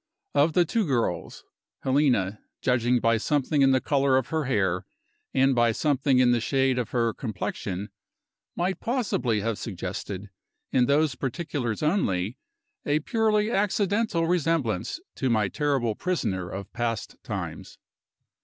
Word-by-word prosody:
Of 150 +3 +3
the 175 +1 +4
two 225 +6 0
girls, 115 - -1 0.4
Helena 130 -8 +2 0.2
judging 125 -1 +2
by 115 0 +3
something 145 +4 +1
in 135 - +6
the 130 -1 +4
color 135 -1 +2
of 130 -2 -1
her 160 -2 -1
hair, 95 -8 0 0.4
and 135 +1 +3
by 120 -2 +3
something 135 +1 +2
in 125 -1 +5
the 120 -1 +2
shade 130 +1 +1
of 120 - -2
her 115 -2 +1
complexion 100 -3 -4 0.7
might 185 +2 -1
possibly 200 - 0
have 115 0 -2
suggested, 95 0 -5 0.4
in 125 -1 +3
those 145 0 +3
particulars 130 -2 -3
only, 110 - 0 0.4
a 150 +1 +1
purely 215 +3 +1
accidental 200 -3 +1
resemblance 165 - 0 0.2
to 130 - 0
my 110 -4 +2
terrible 140 -6 0
prisoner 95 - -2
of 100 +1 -7
past 115 -3 -3
times. - - -6
130 Hz, 135 wpm, -26 LUFS, 115-155 Hz, 0.7 s, in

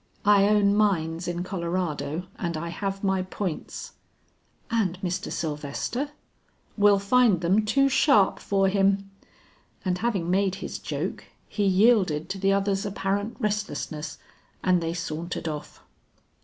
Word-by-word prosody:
"I 200 -1 +6
own 205 -1 +4
mines 175 -5 +1
in 175 0 -2
Colorado 170 -4 -2 0.2
and 170 -2 -2
I 170 +2 -4
have 195 +3 -4
my 190 -1 +2
points." 185 -2 -5 0.8
"And 195 -6 0
Mr. 185 +2 -3
Sylvester?" 155 - -3 0.7
"Will 205 -1 +5
find 200 -2 +3
them 190 +5 +3
too 275 +6 +3
sharp 260 -7 +4
for 195 -1 +1
him." 195 0 +1 0.7
And 180 -1 0
having 195 -7 0
made 190 0 +2
his 195 - -6
joke, - - -4 0.2
he 205 - -1
yielded 190 -5 +3
to 195 - -4
the 195 +1 +2
other's 195 0 +1
apparent 200 +1 -2
restlessness, 205 - -3 0.5
and 180 -1 +3
they 165 0 -2
sauntered 170 0 -4
off. 150 -2 -6
195 Hz, 130 wpm, -26 LUFS, 170-205 Hz, 0.8 s, I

